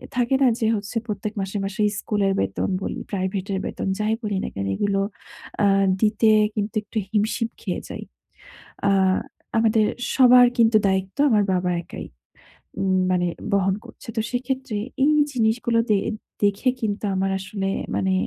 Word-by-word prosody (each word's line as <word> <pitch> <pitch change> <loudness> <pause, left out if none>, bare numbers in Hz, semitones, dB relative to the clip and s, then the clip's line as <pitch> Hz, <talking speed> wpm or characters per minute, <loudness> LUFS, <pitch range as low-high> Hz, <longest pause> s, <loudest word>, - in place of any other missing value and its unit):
থাকে 245 +2 +2
না? 265 - +6
যে 220 - +1
হচ্ছে 205 +2 -4
প্রত্যেক 210 0 -4
মাসে, 195 +2 -3
মাসে 195 +2 -3 0.2
স্কুলের 200 -2 0
বেতন - - -1
বলি, - - -4
প্রাইভেটের 190 0 -2
বেতন - - -4
যাই 215 +1 +1
বলি 205 -2 -1
না - - -2
কেন 100 0 -3
এগুলো 200 - 0 0.6
অ্যা 205 - +4 0.3
দিতে 220 +1 +3 0.3
কিন্তু 210 +1 -2
একটু 210 +2 -8
হিমশিম 220 +2 0
খেয়ে - - -3
যাই। - - -6 0.9
আ - - +4 0.7
আমাদের 220 -1 +3 0.3
সবার 250 -1 +7
কিন্তু 225 -1 +5
দায়িত্ব 190 +3 -1
আমার 210 -3 +4
বাবা 180 0 0
একাই - - -8 0.7
উম 190 -1 +2
মানে 180 -1 +1 0.3
বহন 195 -1 +2
করছে। 235 - -14
তো - - +3
সেক্ষেত্রে 260 -1 -3 0.3
এই 305 - +4 0.2
জিনিসগুলো 230 -1 +1
দে 210 - +4 0.5
দেখে 205 +5 +2
কিন্তু 210 -1 -2
আমার 190 +1 0
আসলে 195 +1 -4 0.3
মানে 190 0 +1
210 Hz, 150 wpm, -23 LUFS, 195-230 Hz, 0.9 s, সবার